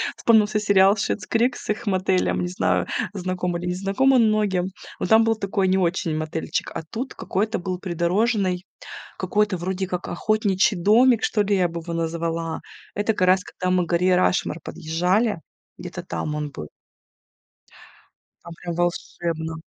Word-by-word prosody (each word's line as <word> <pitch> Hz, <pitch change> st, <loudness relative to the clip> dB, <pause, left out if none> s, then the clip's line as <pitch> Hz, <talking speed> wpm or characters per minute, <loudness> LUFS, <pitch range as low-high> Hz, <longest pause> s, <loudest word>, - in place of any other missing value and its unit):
вспомнился 215 Hz, -2 st, +3 dB
сериал 200 Hz, -1 st, +5 dB
Schitt's 210 Hz, 0 st, -2 dB
Creek 240 Hz, +3 st, +2 dB
с -, -, -10 dB
их 220 Hz, +1 st, -5 dB
мотелем, 185 Hz, -1 st, +1 dB
не 180 Hz, -, -1 dB
знаю, 185 Hz, -, 0 dB, 0.3 s
знакомы 180 Hz, -2 st, -2 dB
или 180 Hz, -, -5 dB
не 180 Hz, -, 0 dB
знакомы 200 Hz, +8 st, +2 dB
многим, 210 Hz, -5 st, +2 dB, 0.3 s
но -, -, -1 dB
там 220 Hz, +2 st, +6 dB
был 225 Hz, 0 st, +2 dB
такой 195 Hz, -2 st, -1 dB
не 190 Hz, +1 st, +3 dB
очень 170 Hz, -2 st, 0 dB
мотельчик, 155 Hz, +1 st, -3 dB
а -, -, -4 dB
тут 255 Hz, +4 st, -5 dB
какой-то 215 Hz, +4 st, -1 dB
был 180 Hz, 0 st, -4 dB
придорожный, 185 Hz, +1 st, 0 dB, 0.6 s
какой-то 205 Hz, 0 st, 0 dB
вроде 190 Hz, +2 st, -2 dB
как 180 Hz, -1 st, -4 dB
охотничий 200 Hz, 0 st, +1 dB
домик, 230 Hz, +5 st, +4 dB
что 210 Hz, -, +2 dB
ли, 200 Hz, 0 st, +1 dB
я 180 Hz, -2 st, +2 dB
бы 170 Hz, 0 st, -5 dB
его 170 Hz, 0 st, -6 dB
назвала. 165 Hz, 0 st, -2 dB, 0.3 s
Это 205 Hz, +2 st, +1 dB
как 185 Hz, -3 st, +1 dB
раз 185 Hz, +1 st, +5 dB
когда 185 Hz, 0 st, -3 dB
мы 180 Hz, -1 st, +2 dB
к -, -, -11 dB
горе 180 Hz, +1 st, +3 dB
Рашмор 180 Hz, -2 st, +1 dB
подъезжали, 180 Hz, +5 st, 0 dB, 0.4 s
где-то -, -, -7 dB
там 85 Hz, -, -4 dB
он 150 Hz, -1 st, -3 dB
был. 75 Hz, -, -8 dB, 1.7 s
Там 170 Hz, -, -10 dB
прям 170 Hz, -1 st, -4 dB
волшебно. 170 Hz, -2 st, -2 dB
185 Hz, 160 wpm, -23 LUFS, 170-210 Hz, 1.7 s, там